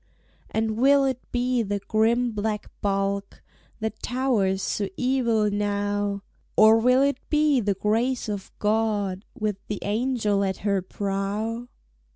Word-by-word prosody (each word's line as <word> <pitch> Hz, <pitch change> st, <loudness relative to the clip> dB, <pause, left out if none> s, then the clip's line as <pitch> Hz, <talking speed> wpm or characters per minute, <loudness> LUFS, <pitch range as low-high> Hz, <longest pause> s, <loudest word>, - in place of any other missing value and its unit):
And 220 Hz, 0 st, -1 dB
will 275 Hz, +3 st, +5 dB
it 260 Hz, -2 st, -1 dB
be 245 Hz, 0 st, +1 dB
the 205 Hz, -2 st, -1 dB
grim 230 Hz, +4 st, +1 dB
black 210 Hz, 0 st, -3 dB
bulk, 195 Hz, 0 st, -1 dB, 0.4 s
That 220 Hz, 0 st, -4 dB
towers 235 Hz, -7 st, 0 dB
so 200 Hz, -2 st, -1 dB
evil 235 Hz, -5 st, +1 dB
now? 205 Hz, 0 st, -1 dB, 0.3 s
Or 220 Hz, +1 st, +7 dB
will 250 Hz, +3 st, +4 dB
it 280 Hz, -1 st, +1 dB
be 300 Hz, -3 st, +3 dB
The 205 Hz, -3 st, 0 dB
Grace 230 Hz, +6 st, 0 dB
of 205 Hz, -2 st, -5 dB
God, 210 Hz, -3 st, 0 dB
With 210 Hz, -2 st, -1 dB
the 210 Hz, -, -3 dB
angel 215 Hz, -2 st, 0 dB
at 190 Hz, -1 st, -1 dB
her 200 Hz, -2 st, +2 dB
prow? 205 Hz, +5 st, -3 dB
215 Hz, 135 wpm, -25 LUFS, 200-245 Hz, 0.4 s, Or